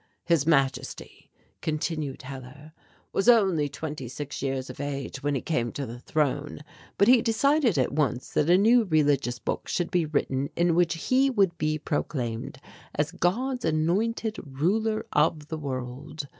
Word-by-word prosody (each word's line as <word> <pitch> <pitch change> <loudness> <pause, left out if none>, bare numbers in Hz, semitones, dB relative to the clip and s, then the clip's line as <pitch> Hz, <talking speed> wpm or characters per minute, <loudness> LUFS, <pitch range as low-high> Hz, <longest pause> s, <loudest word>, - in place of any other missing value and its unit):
"His 165 -3 +2
Majesty," 135 -5 0 0.3
continued 155 -3 -3
Hellar, 135 +3 -10 0.4
"was 195 +5 +3
only 190 -11 +4
twenty 150 -3 -6
six 140 +3 -6
years 135 -1 -2
of - - -9
age 140 -1 -4
when 145 0 0
he 135 - -1
came 120 -8 -1
to 140 - -3
the 120 0 -8
throne, 145 +1 -1 0.4
but 200 - +4
he 250 -1 +7
decided 245 - +2
at 130 - +1
once 140 -4 -1
that 150 - +1
a 180 - +7
new 230 +4 +5
religious 145 -7 +2
book - - -4
should 175 - -1
be 175 -4 +1
written 140 -2 -1
in 170 0 +2
which 170 0 +2
he 260 +11 +2
would 195 -9 +2
be 155 0 0
proclaimed 130 -6 -3 0.4
as 150 +1 0
'God's 245 +9 -1
Anointed 205 +8 0
ruler 200 +11 0
of 150 0 +1
the 160 - -3
World.' 140 +2 -5
155 Hz, 155 wpm, -27 LUFS, 140-185 Hz, 0.4 s, he